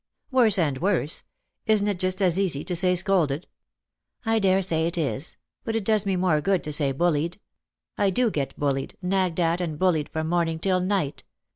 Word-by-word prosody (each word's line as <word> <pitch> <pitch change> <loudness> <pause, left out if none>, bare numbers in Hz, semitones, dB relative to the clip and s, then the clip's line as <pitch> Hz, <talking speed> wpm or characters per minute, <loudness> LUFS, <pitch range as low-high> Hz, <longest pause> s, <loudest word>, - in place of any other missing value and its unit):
" - - -57
Worse 235 -6 +4
and 145 -7 0
worse. 175 -4 0 0.5
Isn't 210 -2 +3
it 200 -4 -1
just 185 +2 0
as 180 0 +3
easy 170 -8 0
to 180 - -3
say 180 +1 +3
scolded? 175 -5 0 0.3
" - - -64
" - - -39
I 225 - +3
daresay 185 -5 +2
it 170 - -3
is; 150 -1 -2 0.3
but 225 - -3
it 225 - 0
does 215 0 +1
me 195 - +1
more 180 -4 +2
good 190 +3 +1
to 150 - -3
say 145 -2 +1
bullied. 165 +4 0 0.6
I 200 - +3
do 230 +4 +1
get 140 -6 -3
bullied, 135 -2 -2
nagged 185 -2 0
at 170 +1 +1
and 160 -4 -3
bullied 165 -4 +1
from 160 0 -3
morning 165 -1 0
till 185 +2 +1
night. 180 -6 -1
180 Hz, 200 wpm, -25 LUFS, 160-195 Hz, 0.6 s, Worse